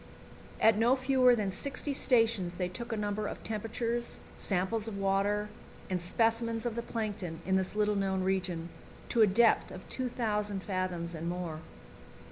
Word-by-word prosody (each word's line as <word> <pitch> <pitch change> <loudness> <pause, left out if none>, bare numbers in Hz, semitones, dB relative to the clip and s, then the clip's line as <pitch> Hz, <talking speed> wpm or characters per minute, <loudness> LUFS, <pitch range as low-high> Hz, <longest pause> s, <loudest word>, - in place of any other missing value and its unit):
At 220 -1 +5
no 240 +3 +5
fewer 255 -2 +4
than 205 -4 -1
sixty 280 +7 -2
stations 225 -9 +2
they 180 0 -1
took 235 +6 -7
a 225 - -1
number 210 0 -1
of - - -7
temperatures, 230 +2 -2 0.2
samples 205 +4 0
of 210 -3 -4
water, 200 +2 +1 0.4
and 180 -1 0
specimens 230 +4 0
of 240 - 0
the 235 - -2
plankton 205 -8 -4
in 190 - +2
this 190 +1 0
little 210 0 +2
known 190 -1 0
region, 180 -3 -1 0.4
to 235 - +3
a 215 - +8
depth 225 +4 +4
of 185 - -10
2,000 210 -6 -2
fathoms 180 -3 -2
and 165 +1 -3
more. 175 -3 -4
210 Hz, 160 wpm, -31 LUFS, 185-230 Hz, 0.4 s, a